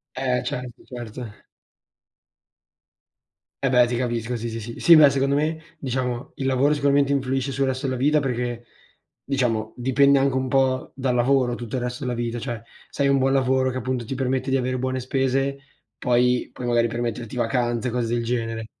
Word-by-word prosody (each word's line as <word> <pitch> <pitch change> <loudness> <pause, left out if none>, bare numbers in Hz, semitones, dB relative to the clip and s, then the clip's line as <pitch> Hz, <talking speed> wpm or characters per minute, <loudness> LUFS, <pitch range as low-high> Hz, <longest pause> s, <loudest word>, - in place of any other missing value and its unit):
Eh, 125 -1 0
certo, 125 -2 -5
certo. 120 -2 -8 2.2
Eh - - +3
beh, 125 -1 +5
ti 120 - -2
capisco 120 -1 -2
sì, 115 0 -4
sì, 115 0 -5
sì. 115 +2 -8
Sì, 170 - +6
beh, 145 -2 +8
secondo 140 0 +1
me, 155 +2 0 0.2
diciamo 125 -1 -3
il 135 - -3
lavoro 135 +3 +3
sicuramente 140 -1 +2
influisce 135 0 -1
sul 135 +1 +1
resto 130 +1 -2
della 130 -1 -2
vita, 150 +4 +3
perché, 120 -3 -3 0.6
diciamo, 115 -5 -1
dipende 140 +3 +4
anche 135 -1 +1
un 130 -1 -1
po' 130 -1 +1
dal 130 -2 -1
lavoro 125 0 +2
tutto 120 +1 -5
il - - -2
resto 125 +2 -4
della 125 -1 -1
vita. 120 0 -3
Cioè, 120 -2 -5 0.3
se 140 - -2
hai - - +4
un 140 0 +3
buon 135 0 +2
lavoro 130 -1 +2
che 130 - -4
appunto 130 0 -2
ti 125 +4 -5
permette 130 0 -1
di 135 - +3
avere 130 0 -1
buone 130 +1 -2
spese, 135 +2 0 0.4
poi 125 0 +2
puoi 125 - -6
magari 120 -1 +2
permetterti 120 0 -4
vacanze, 120 0 0
cose 120 -1 -1
del 120 -1 -1
genere. 115 -1 -2
125 Hz, 185 wpm, -23 LUFS, 120-135 Hz, 2.2 s, beh